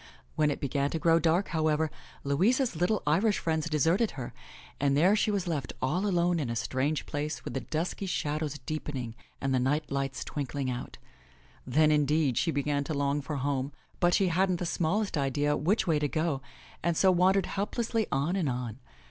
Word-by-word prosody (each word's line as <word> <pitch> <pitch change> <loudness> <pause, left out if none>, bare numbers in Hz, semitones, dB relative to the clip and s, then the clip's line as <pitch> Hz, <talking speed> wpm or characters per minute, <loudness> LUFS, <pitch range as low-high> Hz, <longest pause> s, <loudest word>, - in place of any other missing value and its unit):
When 150 -1 +3
it 145 - -2
began 140 +1 0
to 165 - -2
grow 165 +1 +4
dark, 170 +4 +2
however, 155 -1 +1 0.3
Louisa's 205 - +2
little 180 +6 +1
Irish 190 +8 +3
friends 160 0 -1
deserted 165 - +2
her, 125 -2 -5 0.5
and 140 0 +2
there 185 +7 +5
she 215 - +1
was 200 -3 -1
left 145 -7 -2
all 180 +10 0
alone 175 -2 +2
in 140 -6 -2
a 115 - -2
strange 135 +6 -1
place 150 +1 -4
with - - -5
the - - -1
dusky 170 +5 -3
shad 150 -3 -1
ows 150 -2 -3
deepening 135 -6 -4 0.3
and 135 0 -1
the 130 - +3
night 140 +5 0
lights 135 -1 -2
twinkling 135 -2 -3
out. 125 0 -6 0.7
Then, 155 +4 +4
indeed, 150 -2 +2
she 170 - +1
began 145 -1 0
to 155 - -3
long 140 +1 0
for 150 +2 -4
home, 140 0 -1 0.3
but 175 0 +4
she 190 -2 +3
hadn't 185 +2 +2
the 175 - -3
smallest 175 +2 0
idea 145 +2 +1
which 185 +9 +1
way 160 -4 +2
to 150 - +1
go 155 -2 -1 0.4
and 170 -1 0
so 190 - +5
wandered 185 +1 +3
helplessly 225 +2 -1
on 140 +7 +1
and 175 -7 0
on. 125 -2 -4
155 Hz, 190 wpm, -29 LUFS, 140-175 Hz, 0.7 s, there